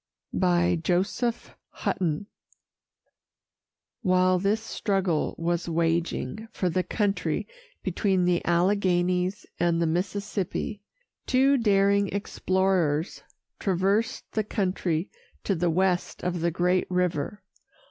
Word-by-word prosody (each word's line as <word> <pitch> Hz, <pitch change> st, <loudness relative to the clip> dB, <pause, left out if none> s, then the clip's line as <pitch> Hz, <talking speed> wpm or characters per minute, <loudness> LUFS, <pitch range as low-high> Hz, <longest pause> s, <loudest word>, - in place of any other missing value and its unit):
JOSEPH 180 Hz, +6 st, +1 dB
HUTTON. 170 Hz, 0 st, -2 dB, 1.8 s
While 185 Hz, 0 st, +3 dB
this 200 Hz, +4 st, +1 dB
struggle 195 Hz, -7 st, -1 dB
was 170 Hz, +1 st, -1 dB
waging 165 Hz, -, -1 dB
for 180 Hz, -4 st, -1 dB
the 185 Hz, -, +1 dB
country 205 Hz, +1 st, -1 dB, 0.4 s
between 190 Hz, -4 st, +1 dB
the 175 Hz, -1 st, +2 dB
Alleghanies 180 Hz, +1 st, +1 dB
and 170 Hz, -1 st, +2 dB
the 170 Hz, -, +2 dB
Mississippi, 200 Hz, +4 st, -2 dB, 0.5 s
two 270 Hz, +2 st, +4 dB
daring 200 Hz, -4 st, +3 dB
explorers 185 Hz, -5 st, 0 dB, 0.4 s
traversed 195 Hz, +4 st, +1 dB
the 215 Hz, -, 0 dB
country 185 Hz, -4 st, -1 dB, 0.3 s
to 200 Hz, -, +1 dB
the 175 Hz, -1 st, +1 dB
west 180 Hz, +1 st, 0 dB
of 180 Hz, -2 st, -1 dB
the 170 Hz, -, +2 dB
great 180 Hz, +2 st, +1 dB
river. 180 Hz, +1 st, -1 dB
185 Hz, 95 wpm, -26 LUFS, 175-200 Hz, 1.8 s, two